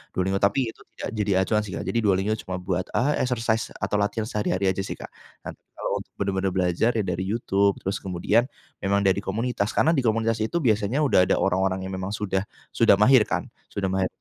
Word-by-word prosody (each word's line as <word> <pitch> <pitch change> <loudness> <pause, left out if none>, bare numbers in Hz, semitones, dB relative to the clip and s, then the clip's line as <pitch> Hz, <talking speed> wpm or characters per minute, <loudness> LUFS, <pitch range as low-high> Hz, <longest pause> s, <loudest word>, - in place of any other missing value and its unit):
Duolingo. 95 +1 0
Tapi 115 +4 +1
itu - - -22
tidak - - -5
jadi 105 -1 +1
acuan 105 +2 +1
sih, 95 - -5
Kak. - - -4
Jadi, 115 - -1
Duolingo 100 -1 +1 0.2
cuma 95 - -3
buat, 90 0 -2
eee, 145 +5 +2
exercise 115 -3 -1
atau 105 - -1
latihan 105 +2 0
sehari-hari 95 -2 0
aja 95 - -5
sih, - - -4
Kak, - - -10 0.3
dan - - -5 0.2
kalo - - -2
untuk - - -12
benar-benar 95 -1 -1
belajar 90 +6 +2
ya 110 - +1
dari 95 0 -2
YouTube. 100 -2 +1
Terus 95 - -2
kemudian 95 +6 +1 0.3
memang 100 +1 +1
dari 95 0 +3
komunitas, 105 +2 -2
karena 160 - +4
di 160 - +2
komunitas 115 -2 +1
itu 150 +10 -1
biasanya 110 +4 +2
udah 90 -10 +4
ada - - +3
orang-orang 95 0 0
yang 95 - -5
memang 95 +3 -3
sudah 100 -1 -2 0.2
sudah 115 -3 +5
mahir 105 +3 +5
kan. - - -3 0.2
Sudah 95 -2 -3
mahir 95 -1 +1
100 Hz, 205 wpm, -25 LUFS, 95-115 Hz, 0.3 s, sudah